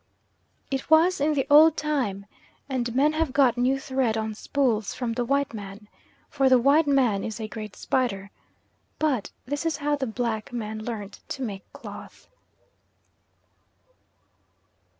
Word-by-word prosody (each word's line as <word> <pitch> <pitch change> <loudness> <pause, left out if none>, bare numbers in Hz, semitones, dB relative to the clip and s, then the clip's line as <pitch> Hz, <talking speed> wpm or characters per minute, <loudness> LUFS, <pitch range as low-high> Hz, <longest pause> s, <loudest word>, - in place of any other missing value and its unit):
It 270 +2 -3
was 320 +1 +5
in 300 +1 +2
the 270 - +1
old 310 +2 +7
time, 250 -11 -1 0.4
and 245 -3 -2
men 295 +4 +3
have 315 -3 0
got 265 -3 +4
now 250 +2 +2
thread 260 -4 -1
on 220 0 -2
spools 225 -2 -1
from 240 -2 -2
the 245 +1 -1
white 275 +1 0
man, 205 0 -9 0.4
for 270 -2 +2
the 255 - +7
white 285 +5 +4
man 250 -8 +2
is 220 +1 -5
a 220 - -4
great 215 -2 -8
spider; 200 -7 -1 0.7
but 275 -9 0 0.2
this 285 +4 -3
is 325 -3 -1
how 295 0 0
the 270 -2 -3
black 225 -1 -3
man 220 -2 -4
learnt 215 -3 -6
to 270 - -4
make 200 -5 -6
cloth. - - -11
255 Hz, 150 wpm, -25 LUFS, 220-285 Hz, 0.7 s, old